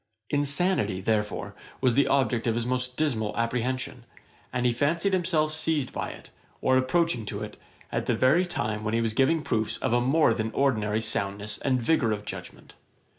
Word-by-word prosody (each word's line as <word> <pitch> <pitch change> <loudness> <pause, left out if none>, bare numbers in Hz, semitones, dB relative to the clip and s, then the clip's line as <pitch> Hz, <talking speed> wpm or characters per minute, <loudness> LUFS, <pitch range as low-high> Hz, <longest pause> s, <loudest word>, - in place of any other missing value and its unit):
Insanity, 145 - +2
therefore, 105 +1 -1 0.3
was 130 -2 +3
the 140 +3 +3
object 130 -4 +1
of 115 - +1
his 120 0 -1
most 125 0 -2
dismal 115 -10 0
apprehension; 125 +1 -2 0.5
and 125 -1 -1
he 120 - +3
fancied 165 +10 +1
himself 165 -4 +1
seized 155 -4 0
by - - -3
it, - - -12 0.3
or 130 - +2
approaching 130 0 +1
to 105 0 -5
it, 105 - -7 0.4
at - - -2
the 120 - +2
very 140 +10 +3
time 110 -11 -3
when 105 +1 -1
he - - +2
was 115 -1 0
giving 140 +6 +2
proofs 110 -6 -1
of - - -1
a 120 - +3
more 135 0 +3
than 110 0 -2
ordinary 110 -6 +1
soundness 105 -1 -2
and 130 -2 +1
vigour 115 -4 +2
of 105 -1 -3
judgement. - - -9
125 Hz, 180 wpm, -27 LUFS, 110-145 Hz, 0.5 s, was